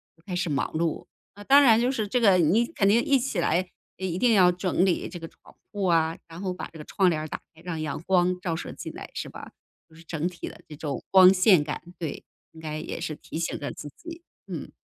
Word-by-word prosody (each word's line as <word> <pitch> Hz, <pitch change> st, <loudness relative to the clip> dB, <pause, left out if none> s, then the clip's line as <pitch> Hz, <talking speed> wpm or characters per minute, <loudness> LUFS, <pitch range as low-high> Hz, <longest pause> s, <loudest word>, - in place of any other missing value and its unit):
就 165 Hz, -, -28 dB
开 185 Hz, -, -6 dB
始 180 Hz, -3 st, -1 dB
忙 140 Hz, -, -1 dB
碌， 165 Hz, 0 st, -1 dB, 0.3 s
啊， 205 Hz, +1 st, -12 dB
当 280 Hz, +6 st, +7 dB
然 235 Hz, -4 st, +6 dB
就 250 Hz, +2 st, +2 dB
是 220 Hz, -6 st, -2 dB
这 245 Hz, +4 st, 0 dB
个 195 Hz, -4 st, +6 dB
你 180 Hz, +9 st, +3 dB
肯 220 Hz, -9 st, 0 dB
定 225 Hz, +4 st, +4 dB
一 275 Hz, -2 st, +3 dB
起 240 Hz, -7 st, -2 dB
来 180 Hz, +2 st, +1 dB, 0.3 s
一 185 Hz, -2 st, -3 dB
定 235 Hz, +2 st, +3 dB
要 180 Hz, -3 st, +6 dB
整 180 Hz, +1 st, 0 dB
理 180 Hz, -, 0 dB
这 175 Hz, -, -8 dB
床 165 Hz, -, -10 dB, 0.3 s
铺 205 Hz, -, -8 dB
户 -, -, +1 dB
啊， 165 Hz, -1 st, +2 dB
然 165 Hz, +3 st, -10 dB
后 185 Hz, -2 st, -2 dB
把 180 Hz, -, -6 dB
这 -, -, -10 dB
个 -, -, -7 dB
窗 190 Hz, -2 st, +2 dB
帘 155 Hz, -2 st, -1 dB
儿 155 Hz, -, -5 dB
打 -, -, -5 dB
开， 160 Hz, -, -18 dB
让 175 Hz, -2 st, -5 dB
阳 155 Hz, 0 st, -4 dB
光 180 Hz, -1 st, +2 dB
照 170 Hz, -3 st, -2 dB
射 -, -, -6 dB
进 -, -, -7 dB
来 -, -, -9 dB
是 -, -, -5 dB
吧？ -, -, -10 dB, 0.4 s
就 160 Hz, -, -20 dB
是 165 Hz, -, -15 dB
整 160 Hz, +1 st, -2 dB
体 180 Hz, -1 st, -7 dB
的 -, -, -14 dB
这 150 Hz, -, -9 dB
种 145 Hz, -3 st, -4 dB
光 190 Hz, 0 st, +8 dB
线 185 Hz, -4 st, +5 dB
感， 150 Hz, -, -5 dB, 0.2 s
对， 160 Hz, -4 st, -5 dB, 0.3 s
应 160 Hz, -, -15 dB
该 155 Hz, -1 st, -4 dB
也 155 Hz, -, -6 dB
是 160 Hz, -2 st, -4 dB
提 160 Hz, -, -8 dB
醒 170 Hz, -, -2 dB
着 145 Hz, -, -4 dB
自 150 Hz, -, -9 dB
己， 340 Hz, 0 st, -10 dB, 0.2 s
嗯。 -, -, -7 dB
180 Hz, 275 characters per minute, -26 LUFS, 160-200 Hz, 0.4 s, 光